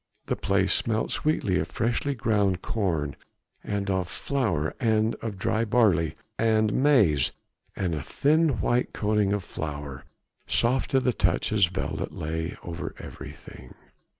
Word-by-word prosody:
The - - -1
place - - +2
smelt 110 -1 0
sweetly 105 -12 +1
of - - -1
freshly 120 +5 -1
ground 105 -5 +1
corn, 80 -10 -1 0.5
of 100 -3 -1
flour 100 - -1
and 110 -2 +2
of 110 -4 -4
dry 110 +3 0
barley 105 -9 +3 0.2
and 110 -1 +3
maize, 105 - +4 0.4
and 90 -3 -1
a 75 - -2
thin 155 - +2
white 125 +1 +1
coating 105 -2 +1
of 100 -2 0
flour 75 -5 -6 0.4
soft 125 +3 +1
to 135 - +3
the 125 -1 +1
touch - - +1
as 100 -5 +5
velvet 95 +2 -3
lay 80 +2 -4
over 85 0 -5
everything. 65 - -10
105 Hz, 135 wpm, -26 LUFS, 85-115 Hz, 0.5 s, as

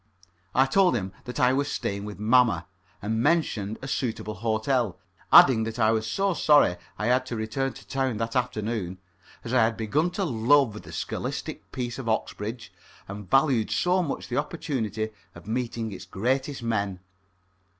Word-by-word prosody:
I 130 - +5
told 180 +2 +3
him 95 -4 -2
that 125 - -5
I 125 +1 +4
was 140 +2 0
staying 100 +1 -3
with 105 -1 -7
mamma, 110 -4 +3 0.4
and 110 +2 0
mentioned 110 -9 +1
a - - -4
suitable 115 -5 -2
hotel, 110 +1 0 0.3
adding 125 -4 +8
that 115 +1 -5
I 110 -2 +4
was 110 0 0
so 195 - +1
sorry 145 - +4 0.2
I 105 - -2
had 125 +2 +3
to 120 - -4
return 110 +4 -2
to - - -14
town 130 -4 -1
that 115 +2 -3
afternoon, 110 -6 -2 0.5
as 120 - -5
I 130 - +5
had 110 0 +1
begun 145 +10 +1
to 195 - +1
love 120 -3 +3
the - - -12
scholastic - - -5
peace 120 0 -4
of 120 -4 -4
Oxbridge 110 +1 -3 0.3
and 100 -1 -8
valued 135 -4 +3
so 180 +1 +2
much 155 -6 -4
the 125 - -3
opportunity 130 -8 -2 0.2
of 85 - -12
meeting 115 0 -3
its 95 - -8
greatest 130 +5 -1
men. 100 -5 -1
115 Hz, 170 wpm, -26 LUFS, 110-135 Hz, 0.5 s, adding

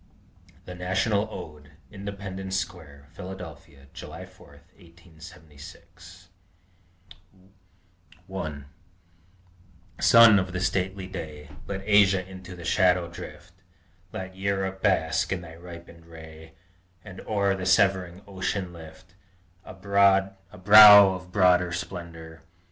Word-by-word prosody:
THE 90 - -9
NATIONAL 95 +4 -1
ODE 75 -7 -11 0.2
INDEPENDENCE 95 -1 -6
SQUARE, 80 -6 -8
PHILADELPHIA, 85 -7 -11
JULY - - -10
4, - - -19 0.3
1876 85 +1 -16 0.8
I 90 +1 -21 0.9
1 80 -7 -7 1.3
Sun 115 -3 +6
of 95 0 -5
the 90 - -3
stately 95 +1 -2
Day, 75 -5 -9 0.2
Let 95 -1 -6
Asia 100 -3 +3
into 95 -1 -11
the 85 -1 -11
shadow 90 -2 +1
drift, 90 0 -12 0.6
Let 95 0 -8
Europe 95 0 -3
bask - - 0
in 95 -2 -3
thy 80 -2 -12
ripened 85 -1 -14
ray, 80 -1 -14 0.5
And 95 -2 -11
over 100 -2 -1
the 95 -1 -5
severing 95 -1 +1
ocean 95 -1 -4
lift 85 +2 -14 0.5
A - - -12
brow 100 0 +2 0.2
of 100 -2 +7
broader 90 -2 +2
splendor! 85 -2 -8
90 Hz, 105 wpm, -25 LUFS, 85-95 Hz, 1.3 s, of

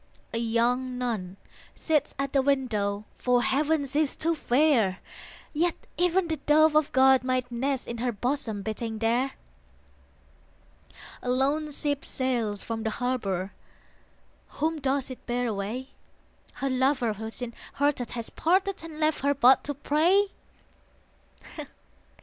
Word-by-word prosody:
A 230 - 0
young 245 +2 +1
nun 210 -7 -3 0.4
sits 300 -3 0
at 275 +1 -2
the 275 - +4
window; 215 -7 0
For 245 -1 +2
Heaven 295 +2 +1
she 280 +2 0
is 295 - 0
too 330 +2 0
fair; 250 - +2 0.6
Yet 335 +3 +1 0.2
even 360 +1 +2
the 320 -1 -2
Dove 305 +2 +4
of 305 -1 +3
God 265 0 +5
might 255 -1 -1
nest 265 +2 -1
In 235 -1 -5
her 245 +1 0
bosom 230 -2 -2
beating 220 +1 -4
there. 235 +4 +1 1.9
A 250 - -4
lone 280 +4 +1
ship 285 -1 -1
sails 235 -6 -1
from 225 -1 -4
the 220 - -1
harbour: 210 -6 -2 1.1
Whom 315 +1 0
does 270 0 0
it 255 - -9
bear 245 +1 0
away? 225 +4 -3 0.6
Her 275 - -2
lover 255 -3 +2
who 220 +2 -6
sin 235 +1 -6 0.2
hearted 285 -4 0
has 230 - -4
parted 380 +2 +1
And 320 -2 -9
left 310 0 +2
her 285 +1 +1
but 260 0 +6
to 290 - -2
pray? 345 +8 +2
260 Hz, 140 wpm, -27 LUFS, 235-295 Hz, 1.9 s, but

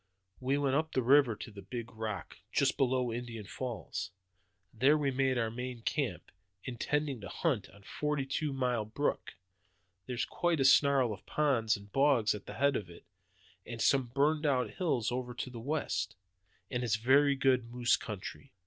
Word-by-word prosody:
"We 130 +2 +1
went 140 -2 +1
up 155 +2 0
the 130 - +1
river 130 -2 +5
to 110 - -8
the 100 -1 -10
big 115 +4 -6
rock, 110 -2 -5
just - - +2
below 130 -3 +1
Indian 115 -3 -5
Falls. 120 +1 -5 0.6
There 135 +7 +4
we 145 -2 0
made 130 0 +1
our 115 -2 0
main 125 0 -6
camp, 125 - -2 0.3
intending 135 +1 -2
to 100 - -7
hunt 140 - -1
on 100 +1 -18
Forty 150 +4 -2
two 145 +2 -2
Mile 125 -4 0
Brook. 110 +2 -2 0.7
There's 125 -2 -1
quite 175 -3 0
a 135 - +3
snarl 135 -4 +5
of 100 - -11
ponds 120 -7 +2
and 100 0 -15
bogs 135 -5 +3
at 105 - -8
the 105 - -7
head 140 +3 +2
of 95 -5 -3
it, 85 - -14 0.6
and 120 -1 -7
some 135 +1 +3
burned 150 +5 +1 0.3
hills 125 - 0
over 125 0 -3
to 125 - -5
the 120 - -7
west, 115 - -2 0.6
and 125 0 -1
it's 115 -3 +2
very 140 +5 +4
good 130 -3 +2
moose 120 0 +3
country. 105 +6 -7
125 Hz, 175 wpm, -32 LUFS, 115-140 Hz, 0.7 s, river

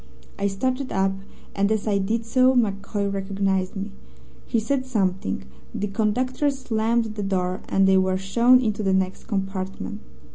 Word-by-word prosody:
I 200 - +2
started 255 +7 -2
up, 195 0 +2 0.4
and 200 +1 +2
as 220 -2 0
I 200 -2 +2
did 225 +4 -1
so 255 +3 +4
MacCoy 200 -2 0
recognized 195 -1 -1
me. 195 +1 -4 0.6
He 230 - +1
said 260 +4 -1
something, 190 - -1 0.3
the 205 - -1
conductor 250 +7 +1
slammed 230 -4 0
the 210 - -4
door, 185 -2 -1
and 195 0 +4
they 190 0 +5
were 185 0 +1
shown 235 +6 +4
into 215 -3 -1
the 195 -2 +1
next 190 0 0
compartment. 195 +1 -4
200 Hz, 155 wpm, -24 LUFS, 195-230 Hz, 0.6 s, they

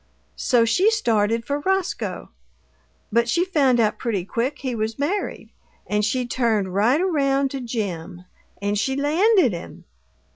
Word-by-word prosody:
So 240 -3 +3
she 360 - +3
started 230 - +1
for 285 +1 -1
Roscoe; 385 +3 -2 0.8
but 235 +2 +2
she 345 +8 +2
found 275 -9 +2
out 215 -2 +1
pretty 205 -7 -2
quick 250 +7 -2
he 260 -2 -4
was 220 0 -3
married, 340 +9 -3 0.3
and 210 0 0
she 250 +4 0
turned 220 -6 0
right 225 +9 +3
around 280 -6 +1
to 275 - -4
Jim 185 -7 -5 0.3
and 205 +1 -1
she 265 +5 0
landed 315 - +3
him! 170 - -8
245 Hz, 145 wpm, -22 LUFS, 215-290 Hz, 0.8 s, So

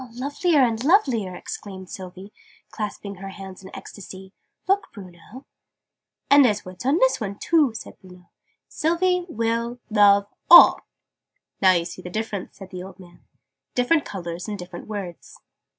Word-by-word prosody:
"Lovelier 285 +4 +1
and 230 -1 0
lovelier!" 260 - +2
exclaimed 190 0 -8
Sylvie, 190 +2 -9 0.4
clasping 205 -2 -6
her 195 +1 -8
hands 195 -1 -10
in 190 - -10
ecstasy. 190 -1 -11 0.3
"Look, 390 +1 +1
Bruno!" 195 +5 -13 0.8
"And 285 0 +7
there's 210 -5 +1
words 185 +6 -7
on 285 +4 +3
this - - +2
one, 200 -2 -4
too," 295 -6 +2
said - - -9
Bruno. 180 -2 -17 0.4
"Sylvie 355 +2 0
will 230 -1 -2
love 200 -1 +5 0.2
all." 345 - +9 0.8
"Now 185 -1 +6
you 170 -2 0
see 185 - -8
the 180 - -8
difference," 210 -1 -5
said 195 -2 -11
the 180 -1 -7
old 190 +1 -11
man: 175 -2 -16 0.5
"different 280 +5 +2
colours 175 -1 -6
and 210 -1 -4
different 175 -1 -9
words." 195 -5 -7
205 Hz, 150 wpm, -23 LUFS, 185-255 Hz, 0.8 s, all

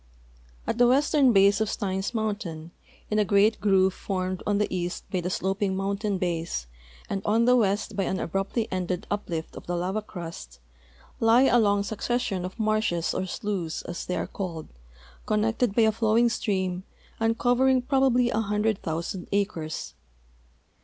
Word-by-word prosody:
At 230 - -2
the 245 - +6
western 275 +1 +4
base 200 0 +5
of 220 - +1
Steins 190 -2 -2
mountain, 205 -8 -3 0.4
in 215 - +2
a - - +4
great 205 +1 +3
groove 190 -2 +3
formed 185 -1 -3
on 205 -1 +2
the 210 - +2
east 175 0 -3
b}'' 185 - 0
the 180 - -2
slo|)ing 190 +1 -1
mountain 200 +1 -1
base 170 - -2 0.4
and 195 - -2
on 225 +3 +2
the 250 +1 +5
west 210 -2 +1
by 195 -1 0
an 190 - -1
abruptly 195 +6 -2
ended 180 -1 -2
Uj)lift 170 -6 -3
of - - -10
the 175 - -1
lava 185 +5 -1
crust, 165 - -9 0.6
lie 230 +3 +5
a 245 -2 +5
long 205 -2 +3
succession 215 -3 -2
of 185 +5 -8
marshes 215 -6 +1
or 190 - -2
slews, 185 -5 -3
as 175 - -5
they 180 - -3
are - - -1
called, 170 -5 -6 0.6
connected 220 +1 +1
by 230 - +5
allowing 220 +2 +3
stream 190 -5 -1 0.4
and 225 0 +1
covering 255 +1 +3
prolaibly 255 -3 +3
a 220 - +1
hundred 210 0 0
thousand 170 +3 -4
acres. 195 -6 -2
200 Hz, 160 wpm, -26 LUFS, 185-225 Hz, 0.6 s, the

